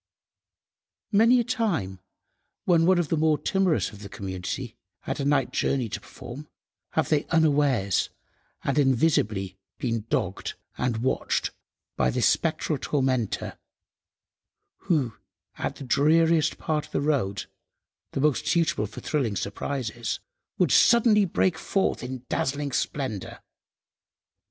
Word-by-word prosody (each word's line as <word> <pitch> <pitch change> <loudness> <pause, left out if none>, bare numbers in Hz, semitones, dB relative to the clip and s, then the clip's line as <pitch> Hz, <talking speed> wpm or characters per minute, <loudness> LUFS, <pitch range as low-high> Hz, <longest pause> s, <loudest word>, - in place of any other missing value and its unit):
Many 230 +4 +5
a - - +2
time, 200 - -1 0.7
when 165 -2 +4
one 185 -1 +5
of 170 -4 0
the - - +2
more 155 0 +3
timorous 190 -3 +1
of 105 - -12
the 100 - -8
community 100 +5 -5 0.3
had - - -4
a 140 - -1
night 140 -2 +2
journey 130 -5 0
to - - -5
perform, 140 +5 -10 0.5
have 160 -2 +1
they 150 -2 +2
unawares 145 - +2 0.5
and 140 +2 +1
invisibly 110 - +1 0.2
been 115 -3 -2
dogged 95 +1 -2 0.2
and 120 -2 -1
watched 130 - 0 0.5
by 65 - +3
this - - +1
spectral - - +1
tormentor, 130 -6 -1 1.3
who, 140 -10 +1 0.5
at - - -2
the - - -9
dreariest 160 +4 +3
part 155 -2 -2
of - - -26
the - - +1
road—the 135 -3 -4
most 150 -1 +1
suitable 165 -10 +1
for 100 - -10
thrilling 130 -9 -1
surprises—would 120 - -3
suddenly 225 -4 +5
break 175 -1 +1
forth 195 - 0
in 125 0 -6
dazzling 140 +1 -1
splendour. 130 -6 -3
140 Hz, 120 wpm, -26 LUFS, 115-160 Hz, 1.3 s, Many